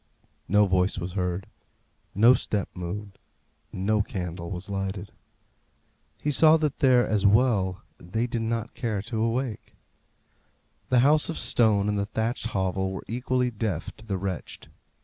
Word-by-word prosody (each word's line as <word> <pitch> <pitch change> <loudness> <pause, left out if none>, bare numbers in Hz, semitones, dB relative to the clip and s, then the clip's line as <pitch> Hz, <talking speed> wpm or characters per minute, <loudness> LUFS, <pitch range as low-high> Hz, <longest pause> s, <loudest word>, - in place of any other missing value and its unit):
No 105 +2 +4
voice 95 0 +1
was 90 -1 -4
heard; 90 -1 -2 0.7
no 115 +5 +7
step 105 -6 -1
moved; 95 +3 -6 0.5
no 105 +3 +1
candle 90 -4 -5
was 90 -1 -5
lighted. 95 0 -4 1.1
He 150 - -1
saw 155 +2 +6
that 150 -3 -2
there, 130 -4 +4
as 105 -3 +1
well, 100 -4 +3 0.2
they 110 +7 -2
did 120 -1 -2
not 115 0 -2
care 110 -5 -2
to 115 -1 -3
awake. 115 0 -2 1.1
The 125 -1 +4
house 150 +4 +4
of 165 - -3
stone 105 -4 +2
and 105 -1 0
the 100 - -1
thatched 115 +3 -2
hovel 95 -2 -1
were 95 - -6
equally 125 +1 0
deaf 105 -7 -3
to 110 - -14
the 100 -2 -1
wretched. 95 -1 -5
105 Hz, 150 wpm, -26 LUFS, 95-120 Hz, 1.1 s, no